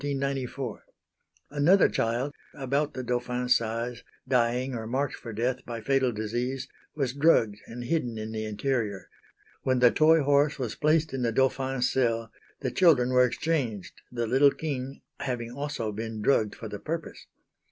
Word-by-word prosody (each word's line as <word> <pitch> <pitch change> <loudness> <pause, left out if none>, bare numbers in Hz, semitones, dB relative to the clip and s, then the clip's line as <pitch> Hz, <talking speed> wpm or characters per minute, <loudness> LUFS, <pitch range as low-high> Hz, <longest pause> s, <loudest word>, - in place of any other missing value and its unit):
Another 155 +7 +5
child 120 +5 -1 0.2
about 140 +2 -1
the 130 - -4
Dauphin's 125 0 +1
size, 115 +1 -2 0.2
dying 125 +1 +1
or 110 -2 -4
marked 135 +4 -1
for 115 - -8
death 125 +4 -1
by 120 -1 -6
fatal 130 +2 +1
disease, 120 +5 -3 0.3
was 135 -4 -1
drugged 125 -8 +3
and 120 +1 -7
hidden 120 -4 -1
in 110 0 -5
the 110 -1 -3
interior. 105 -2 -2 0.5
When 130 -1 +1
the 125 -1 +6
toy 160 +1 +5
horse 145 +1 +3
was 125 -6 -3
placed 155 +2 +1
in 135 - -2
the 120 -1 +1
Dauphin's 130 0 +1
cell 115 -3 0 0.3
the - - -1
children 145 -9 +4
were 125 0 +5
exchanged, 125 - -2
the 120 -1 -2
little 135 +5 +5
king 135 -3 -5 0.2
having 120 -3 -3
also 140 -4 -3
been 110 +1 -5
drugged 110 -5 +2
for 115 - -7
the 105 -1 -6
purpose. 165 +5 -5
125 Hz, 150 wpm, -27 LUFS, 115-140 Hz, 0.5 s, the